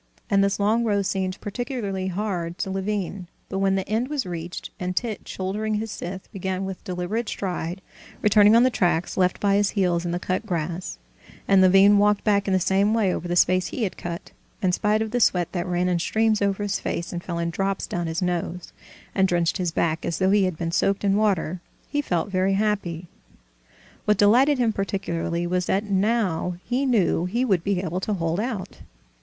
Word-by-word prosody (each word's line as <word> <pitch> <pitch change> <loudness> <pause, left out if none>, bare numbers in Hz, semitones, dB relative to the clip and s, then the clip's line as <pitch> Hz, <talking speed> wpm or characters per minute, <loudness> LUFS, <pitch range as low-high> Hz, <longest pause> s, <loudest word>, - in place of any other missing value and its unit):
And 195 0 +4
this 200 +1 0
long 215 +4 +2
row 205 -3 +1
seemed 190 -1 -2
particularly 205 -4 -3
hard 180 -3 -2
work - - -26
to 190 - -2
Levin; 195 -1 -3 0.2
but 195 - -2
when 195 0 +2
the 190 -1 -2
end 225 +4 0
was 285 -5 -2
reached 170 -1 -6
and 180 0 -3
Tit, 225 0 -3
shouldering 210 +3 -2
his 220 0 -3
scythe, 190 -1 -6
began 190 0 -3
with 190 -1 -6
deliberate 195 +4 -3
stride 180 -1 -4 0.4
returning 210 +1 +6
on 235 - +6
the 255 - +3
tracks 175 -5 0
left 185 -1 +1
by 200 -1 +3
his 205 -1 +2
heels 175 -3 +2
in 175 - -3
the 175 - -1
cut 185 +3 -2
grass, 175 -2 -3 0.5
and 195 -1 +5
Levin 195 +2 +6
walked 210 0 +3
back 205 -2 +2
in - - +1
the - - +3
same 195 +4 +2
way 200 -5 +2
over 175 - -4
the 175 - -1
space 180 +1 +3
he 235 - -3
had 195 - -2
cut, 170 0 -6 0.3
in 190 -4 +1
spite 210 +4 +1
of 220 - -6
the 245 - 0
sweat 180 -6 +2
that 175 -1 -3
ran 180 0 0
in 180 -1 +1
streams 220 +4 +1
over 200 0 0
his 205 -1 -1
face 170 - -3
and 175 0 -4
fell 170 -2 -4
in 170 0 -1
drops 195 +2 -1
down 175 -1 -3
his 165 +3 -2
nose, 175 0 -3 0.4
and 190 -1 +3
drenched 175 -1 +1
his 180 -3 -1
back 165 -1 0
as 170 - -2
though 190 0 +2
he 200 -1 +4
had 185 -4 -2
been 165 0 -2
soaked 195 +4 +1
in 200 -1 +3
water, 190 -5 0 0.3
he 290 - +1
felt 180 - -1
very 190 +1 +2
happy. 195 -5 -1 1.0
What 210 -1 +3
delighted 250 +8 +5
him 235 -3 +1
particularly 175 -4 -2
was 180 0 -1
that 195 +2 +1
now 195 -4 0
he 260 +3 0
knew 200 -8 +2
he 235 +8 0
would 190 -8 +1
be 195 -2 0
able 180 +1 -2
to 205 +2 -2
hold 165 0 -1
out. 220 -4 -4
190 Hz, 210 wpm, -24 LUFS, 180-210 Hz, 1.0 s, returning